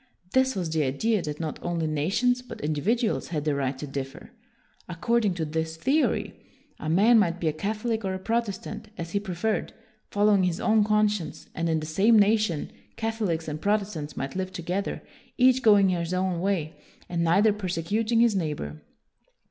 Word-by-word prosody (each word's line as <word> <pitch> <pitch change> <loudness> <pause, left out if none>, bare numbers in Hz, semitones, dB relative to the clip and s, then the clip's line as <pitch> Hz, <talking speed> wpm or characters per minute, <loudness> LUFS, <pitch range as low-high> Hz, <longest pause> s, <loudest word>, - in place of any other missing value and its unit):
This 260 0 +2
was 175 -4 -2
the 160 -1 +1
idea 195 +11 0
that 150 -2 -5
not 160 -2 -4
only 170 -2 -1
nations 195 +12 +1
but 250 - -10
individuals 210 - 0
had 155 -3 -3
the 150 - +2
right 135 -1 -1
to 150 - -5
differ. 135 -1 -6 0.6
According 210 +3 +1
to 165 -2 -2
this 160 +1 -3
theory 275 - +1 0.5
a 155 - -4
man 215 +8 +5
might 175 -3 +1
be 165 - -1
a 155 - +1
Catholic 220 +6 -2
or 190 -1 -2
a - - -2
Protestant 215 0 -3
as 170 0 -5
he 200 - +1
preferred, 200 +2 -2 0.4
following 205 -1 +3
his 180 -2 0
own 220 -1 +3
conscience; 210 -4 0
and 165 +1 -1
in 160 -1 +1
the - - -5
same 195 +9 +4
nation, 210 -6 +2 0.2
Catholics 215 -8 -2
and 155 0 -4
Protestants 200 -8 -1
might 135 +1 -4
live 185 0 -3
together, 180 +3 -3 0.3
each 255 0 +5
going 205 -4 +6
his 175 0 -1
own 185 -2 0
way, 180 -5 -1 0.3
and 170 -1 -1
neither 195 +6 +4
persecuting 210 +4 0
his 235 -3 +4
neighbor. 150 - -3
185 Hz, 170 wpm, -26 LUFS, 160-215 Hz, 0.6 s, going